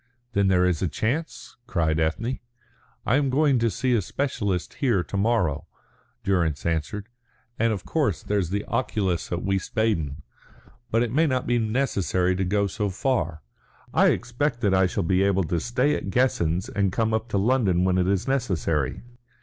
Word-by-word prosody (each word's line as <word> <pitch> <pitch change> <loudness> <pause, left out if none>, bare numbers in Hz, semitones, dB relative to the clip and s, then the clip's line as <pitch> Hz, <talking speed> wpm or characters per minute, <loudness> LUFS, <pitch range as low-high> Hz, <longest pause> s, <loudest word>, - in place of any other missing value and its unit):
"Then 100 -1 +2
there 90 -1 +4
is 90 -4 +1
a 95 - +1
chance?" 125 - -3
cried 80 -8 0
Ethne. 110 +11 -1 0.7
"I 125 - +3
am 140 -2 +1
going 140 -1 +3
to 115 0 +2
see 125 +6 0
a 115 - +3
specialist 100 -5 -2
here 115 -10 +2
to - - -7
morrow," 100 -8 +1 0.6
Durrance 85 -7 0
answered. 85 +5 -2 0.5
"And, 115 0 +3
of 100 -4 -4
course, 140 - 0
there's 100 -5 0
the 100 +2 -2
oculist 105 -7 -1
at 85 - -2
Wiesbaden. 95 -6 -1 0.7
But 115 +1 +2
it 120 -1 -3
may 160 +4 +3
not 130 -2 0
be 120 0 +2
necessary 105 -6 0
to 95 - 0
go 100 +2 +1
so 100 +1 -2
far. 90 - -1 0.5
I - - +5
expect 125 0 0
that 100 -5 +2
I 95 0 +4
shall 95 +2 -2
be 95 +3 +2
able 100 -1 +2
to 85 +1 -1
stay 125 - +1
at - - -3
Guessens 95 -6 +1
and 100 -2 0
come 110 +2 0
up 110 +1 -1
to 105 - 0
London 100 -5 +2
when 90 0 +2
it 90 - +1
is 100 +4 0
necessary. 85 - -1
100 Hz, 175 wpm, -25 LUFS, 90-120 Hz, 0.7 s, I